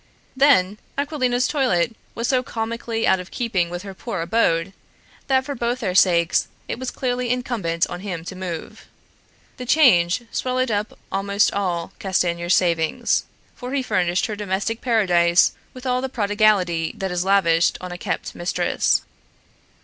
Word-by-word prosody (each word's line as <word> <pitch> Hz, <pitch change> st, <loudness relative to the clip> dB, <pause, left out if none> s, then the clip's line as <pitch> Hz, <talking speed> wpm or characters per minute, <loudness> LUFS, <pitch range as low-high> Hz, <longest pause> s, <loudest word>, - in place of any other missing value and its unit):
Then 215 Hz, -8 st, +4 dB, 0.2 s
Aquilina's 260 Hz, -4 st, 0 dB
toilet 235 Hz, -, +1 dB, 0.2 s
was 230 Hz, +1 st, -2 dB
so 255 Hz, -2 st, +2 dB
comically 230 Hz, -1 st, -3 dB
out 190 Hz, -, +3 dB
of 180 Hz, -, -8 dB
keeping 200 Hz, -9 st, -1 dB
with 175 Hz, +1 st, -6 dB
her 195 Hz, -1 st, -8 dB
poor 195 Hz, -2 st, -5 dB
abode, 170 Hz, -1 st, +1 dB, 0.5 s
that 265 Hz, -1 st, +2 dB
for 285 Hz, -, -3 dB
both 240 Hz, 0 st, -2 dB
their 190 Hz, -5 st, -1 dB
sakes 170 Hz, -3 st, +3 dB, 0.2 s
it -, -, -4 dB
was 260 Hz, -1 st, -3 dB
clearly 250 Hz, -1 st, -2 dB
incumbent 225 Hz, -10 st, -1 dB
on 175 Hz, -, -6 dB
him 180 Hz, -4 st, -5 dB
to 190 Hz, -, -7 dB
move. 180 Hz, -3 st, -7 dB, 0.7 s
The 250 Hz, -, -6 dB
change 235 Hz, -, +4 dB
swallowed 255 Hz, -1 st, -1 dB
up 210 Hz, 0 st, -2 dB
almost 200 Hz, +1 st, +1 dB
all 180 Hz, -4 st, -2 dB
Castanier's 175 Hz, -2 st, +1 dB
savings, 165 Hz, -3 st, +1 dB, 0.3 s
for 250 Hz, +1 st, -7 dB
he 270 Hz, -, 0 dB
furnished 185 Hz, -6 st, +1 dB
his 215 Hz, -, -4 dB
domestic 205 Hz, +3 st, -2 dB
paradise 180 Hz, -7 st, +3 dB, 0.2 s
with 255 Hz, 0 st, -12 dB
all 250 Hz, 0 st, +1 dB
the 265 Hz, -, -3 dB
prodigality 205 Hz, -7 st, +1 dB
that 190 Hz, -1 st, -3 dB
is 180 Hz, 0 st, 0 dB
lavished 175 Hz, -4 st, +3 dB
on 180 Hz, -1 st, -7 dB
a 175 Hz, -, -6 dB
kept -, -, -3 dB
mistress. 175 Hz, +1 st, 0 dB
200 Hz, 155 wpm, -22 LUFS, 175-245 Hz, 0.7 s, Then